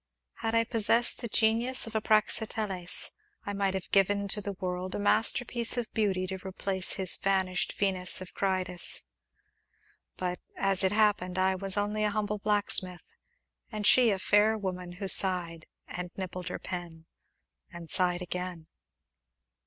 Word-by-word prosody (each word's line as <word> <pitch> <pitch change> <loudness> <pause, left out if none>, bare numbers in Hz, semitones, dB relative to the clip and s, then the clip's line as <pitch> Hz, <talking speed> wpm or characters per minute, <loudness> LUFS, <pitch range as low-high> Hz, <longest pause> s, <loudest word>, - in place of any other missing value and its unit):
Had 225 0 -2
I 230 - +4
possessed 230 +1 +2
the 235 - -4
genius 230 +4 +2
of 225 - -9
a 220 - -1
Praxiteles 215 -4 +2 0.3
I 205 - -4
might 195 -1 -1
have 190 - -6
given 200 +1 +2
to 210 - 0
the 200 0 -5
world 185 -1 -5
a - - -3
masterpiece 235 +3 +3
of 240 -2 -4
beauty 195 -4 0
to 190 0 -6
replace 190 0 -1
his 190 -2 +1
vanished 190 -2 -1
Venus 185 -3 +2
of 185 -1 -10
Cnidus; 185 -2 0 1.1
but, 180 -1 -3 0.2
as 195 -1 +2
it 190 - +2
happened, 205 -4 +1
I 190 0 +2
was 195 +1 -2
only 210 +1 -1
a 210 - +2
humble 210 0 -3
blacksmith, 200 -3 0 0.7
and 215 -2 -5
she 245 +1 +5
a 200 - 0
fair 210 +3 +2
woman 180 -3 -5
who 195 +2 -6
sighed, 175 -4 +1 0.2
and 180 0 -6
nibbled 185 -1 -6
her 180 - -4
pen, 170 -3 -8 0.7
and 170 -2 -10
sighed 180 -1 +3
again. 180 -2 -6
195 Hz, 155 wpm, -28 LUFS, 180-210 Hz, 1.1 s, she